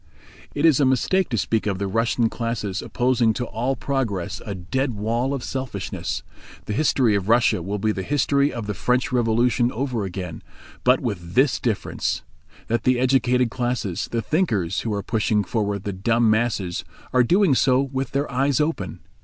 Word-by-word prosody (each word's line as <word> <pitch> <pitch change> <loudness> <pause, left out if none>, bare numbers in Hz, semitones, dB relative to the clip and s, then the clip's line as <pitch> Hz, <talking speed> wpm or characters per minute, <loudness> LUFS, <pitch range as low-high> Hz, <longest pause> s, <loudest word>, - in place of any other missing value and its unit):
It 145 - +1
is 155 -4 +5
a - - +4
mistake 150 +9 +2
to 115 - -1
speak 110 +1 0
of 100 -2 0
the 100 - -2
Russian 115 +3 +1
classes 110 -4 -3
opposing 120 -3 +1
to 125 - -3
all 120 +4 -2
progress 115 -9 -2
a 100 - -5
dead 125 +8 -2
wall 115 +5 -1
of 135 -3 -3
selfishness. 130 -7 -4 0.4
The 105 - -3
history 130 -3 +2
of 100 0 -1
Russia 115 -6 +4
will 100 +4 -3
be 110 +2 +1
the 95 - -3
history 140 +3 +1
of 115 -3 -5
the 105 - -2
French 125 +7 0
Revolution 120 0 +2
over 125 -3 -2
again, 90 -3 -5 0.4
but 125 +1 +4
with 90 -8 -4
this 135 +1 +3
difference: 115 -5 -2 0.4
that 115 +1 0
the 125 -1 +3
educated 125 -1 +2
classes, 120 -7 -2
the 115 -1 -1
thinkers, 110 - 0
who 115 - -3
are 100 -1 -2
pushing 105 -1 +1
forward 100 -1 -2
the 100 - -3
dumb 115 +4 +2
masses 110 -5 0 0.3
are 130 - +5
doing 175 - +4
so 130 0 +3
with 135 0 -2
their 140 +1 -2
eyes 135 +1 +1
open. 150 - -2
120 Hz, 180 wpm, -23 LUFS, 105-130 Hz, 0.4 s, is